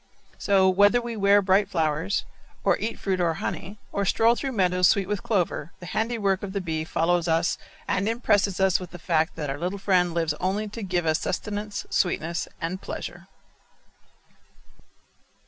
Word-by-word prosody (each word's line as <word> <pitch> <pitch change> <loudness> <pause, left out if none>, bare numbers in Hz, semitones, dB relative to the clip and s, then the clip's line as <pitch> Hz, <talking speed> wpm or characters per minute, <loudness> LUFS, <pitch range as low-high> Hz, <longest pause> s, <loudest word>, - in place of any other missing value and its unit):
So, 195 -2 +3
whether 205 +5 +5
we 235 -1 -5
wear 200 -1 +4
bright 195 +2 +3
flowers, 160 +3 0 0.4
or - - +4
eat 225 +2 -3
fruit 190 -2 -1
or 165 -2 +1
honey, 200 +5 -5
or 200 - -1
stroll 225 +4 +4
through 270 +1 -3
meadows 180 -3 +3
sweet 195 0 +2
with 205 -1 -2
clover, 175 -6 -1
the 175 - -9
handiwork 210 -1 0
of 195 -2 -6
the 200 - -1
bee 160 -4 -2
follows 175 +1 +1
us 165 +2 +1 0.3
and 200 +2 0
impresses 205 -4 +1
us 190 -1 +3
with 180 -2 -8
the 175 - -9
fact 160 -1 0
that 150 -3 -3
our 140 - -5
little 180 +3 -2
friend 180 -3 +2
lives 165 -3 +1
only 195 +4 -1
to 225 +3 -7
give 180 -3 -1
us 155 0 +2
sustenance, 205 +2 -3
sweetness, 170 -2 0
and 180 +3 -3
pleasure. - - -7
190 Hz, 170 wpm, -25 LUFS, 170-205 Hz, 0.4 s, whether